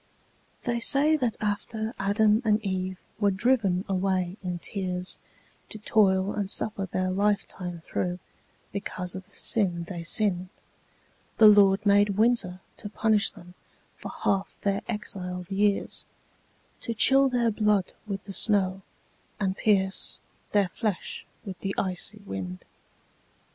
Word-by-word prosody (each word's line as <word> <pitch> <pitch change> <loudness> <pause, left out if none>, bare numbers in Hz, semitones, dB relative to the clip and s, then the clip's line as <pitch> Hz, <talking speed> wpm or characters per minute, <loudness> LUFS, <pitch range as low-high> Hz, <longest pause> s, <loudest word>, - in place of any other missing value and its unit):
They 235 -1 -1
say 285 +6 +5
that 245 -6 -1
after 215 +2 -3
Adam 210 +2 +3
and 215 -1 +3
Eve 185 -1 -2 0.2
were 205 -2 +3
driven 200 -3 +1
away 185 -2 0
in 180 -2 -3
tears 180 0 -4 0.5
To - - -5
toil 200 -2 +2
and 205 -2 -2
suffer 200 -1 +2
their 185 +1 -1
life 200 +1 +1
time 175 -3 -7
through, 180 -1 -2 0.5
because 185 -3 -2
of 190 0 -7
the - - -20
sin 180 -6 +2
they 175 0 -7
sinned, 180 +1 +1 0.9
The 220 - +7
Lord 200 -1 +6
made 205 0 +4
Winter 215 -5 +2 0.2
to 205 - -7
punish 215 0 +2
them 175 +1 -13 0.4
for - - -8
half 195 0 -2
their 200 -1 0
exiled 180 -5 -3
years, 200 +1 0 0.7
To 230 - -3
chill 270 +5 +5
their 240 -2 +1
blood 210 -3 +1
with 195 -2 -4
the 200 - -8
snow, 195 -2 +1 0.6
and 190 -2 0
pierce 195 -3 0 0.3
their 200 -3 +2
flesh 210 0 -4 0.2
with 190 -3 -7
the 195 0 -3
icy 195 +2 -2
wind. 90 - -6
200 Hz, 135 wpm, -27 LUFS, 185-215 Hz, 0.9 s, The